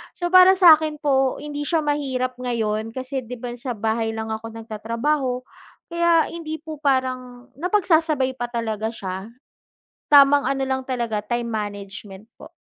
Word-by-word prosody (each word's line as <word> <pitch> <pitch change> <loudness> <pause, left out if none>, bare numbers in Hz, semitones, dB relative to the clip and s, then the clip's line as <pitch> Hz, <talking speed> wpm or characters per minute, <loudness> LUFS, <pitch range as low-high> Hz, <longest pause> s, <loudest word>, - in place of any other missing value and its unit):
So, 350 0 -3
para 370 +1 +8
sa 350 -4 +9
akin 305 -1 -4
po 270 -2 +2
hindi 290 0 -5
siya 325 -3 +1
mahirap 260 -4 -1
ngayon, 225 -2 -2
kasi 260 +1 -4
'di 250 - -6
ba 245 0 -5
sa 245 -2 -4
bahay 225 +1 -1
lang 220 0 -4
ako 225 +1 -6
nagtatrabaho 235 +4 -2 0.5
kaya 340 -1 +3
hindi 315 -2 -5
po 310 -2 -8
parang, 255 -2 -2
napagsasabay 320 -8 +1
pa 240 - -2
talaga 220 -2 -3
siya, 190 -2 -6 0.8
tamang 285 0 +7
ano 270 0 -1
lang 265 0 -1
talaga 235 -4 -2
time 240 +2 -3
management 205 -1 -6
po. - - -13
255 Hz, 150 wpm, -22 LUFS, 225-295 Hz, 0.8 s, sa